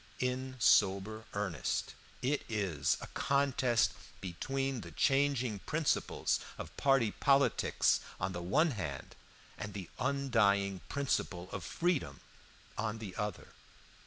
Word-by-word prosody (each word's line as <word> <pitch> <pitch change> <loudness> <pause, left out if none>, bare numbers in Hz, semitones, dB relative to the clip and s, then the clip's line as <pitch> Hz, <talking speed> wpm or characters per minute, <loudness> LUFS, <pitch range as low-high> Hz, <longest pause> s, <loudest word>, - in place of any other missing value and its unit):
In 130 +1 -2
sober 105 0 +3
earnest, 95 -7 -1 0.3
it 140 +3 +1
is 95 -10 0
a - - -6
contest 130 -4 +2 0.3
between 135 +8 -2
the - - -9
changing 135 -6 +2
principles 155 - 0 0.2
of - - -8
party 135 -6 +3
politics 140 +4 +3 0.2
on 95 - -1
the 85 - -4
one 150 - +3
hand 85 - -5 0.4
and 105 -1 -5
the 95 -4 -6
undying 115 -8 +2
principle 95 -10 -1
of 95 - -5
freedom 170 - -1 0.6
on 110 +1 -1
the 105 -5 -7
other. 105 0 -4
115 Hz, 115 wpm, -33 LUFS, 100-135 Hz, 0.6 s, sober